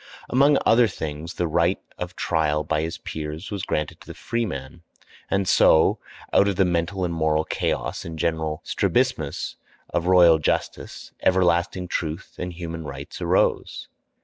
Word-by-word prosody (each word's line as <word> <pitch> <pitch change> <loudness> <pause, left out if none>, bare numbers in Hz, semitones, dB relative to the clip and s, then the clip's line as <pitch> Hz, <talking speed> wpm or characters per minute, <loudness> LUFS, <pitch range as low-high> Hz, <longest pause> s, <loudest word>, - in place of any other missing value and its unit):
Among 140 +3 +5
other 115 +1 +5
things 80 -2 -6
the 90 - 0
right 85 +3 +2 0.2
of - - -5
trial 75 -2 0
by 75 0 0
his 80 +1 -3
peers 80 +5 -6
was 100 -2 -3
granted 75 -4 -3
to - - -15
the - - -8
freeman; 85 - -4 0.5
and 95 -1 0
so, 80 - +5 0.3
out 100 - +5
of 100 - 0
the 95 +1 +3
mental 90 +2 0
and 85 - -2
moral 80 -1 +1
chaos - - -2
and 80 -1 -7
general 80 -1 -1
strabismus - - -1 0.3
of 85 0 -1
royal 85 -3 +6
justice, 75 - -3
everlasting 90 0 +2
truth 80 +1 -4
and 90 0 -3
human 85 -1 -6
rights 70 -2 -8
arose. - - 0
85 Hz, 150 wpm, -24 LUFS, 80-95 Hz, 0.5 s, royal